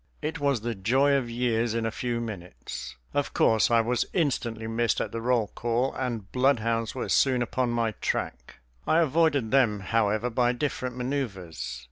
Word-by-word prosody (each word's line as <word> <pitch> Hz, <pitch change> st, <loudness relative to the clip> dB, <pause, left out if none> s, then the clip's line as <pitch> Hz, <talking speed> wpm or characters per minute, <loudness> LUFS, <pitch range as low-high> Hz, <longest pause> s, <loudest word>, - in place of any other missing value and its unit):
It 155 Hz, +1 st, -2 dB
was 140 Hz, -5 st, +1 dB
the 120 Hz, +1 st, -2 dB
joy 130 Hz, +8 st, +2 dB
of 135 Hz, -4 st, +1 dB
years 115 Hz, -1 st, 0 dB
in 115 Hz, -1 st, 0 dB
a 115 Hz, -, -1 dB
few 120 Hz, +1 st, -2 dB
minutes. 100 Hz, -6 st, -7 dB, 0.2 s
Of 145 Hz, -, -1 dB
course 110 Hz, -1 st, +4 dB
I 115 Hz, -1 st, +4 dB
was 120 Hz, +1 st, +1 dB
instantly 120 Hz, -9 st, -1 dB
missed 115 Hz, 0 st, 0 dB
at -, -, -2 dB
the 115 Hz, -, -4 dB
roll 120 Hz, -3 st, +1 dB
call, 120 Hz, +3 st, 0 dB
and 120 Hz, -6 st, -4 dB
bloodhounds 115 Hz, -4 st, +1 dB
were 130 Hz, -, -3 dB
soon 130 Hz, -3 st, +3 dB
upon 125 Hz, +1 st, -1 dB
my 115 Hz, -1 st, 0 dB
track. 60 Hz, -10 st, -3 dB, 0.3 s
I 160 Hz, -, +4 dB
avoided 150 Hz, -6 st, +2 dB
them, 120 Hz, -7 st, +3 dB
however, 110 Hz, +3 st, +1 dB
by 120 Hz, +1 st, +2 dB
different 125 Hz, -1 st, -3 dB
maneuvers. 110 Hz, -, -4 dB
120 Hz, 170 wpm, -27 LUFS, 110-130 Hz, 0.3 s, course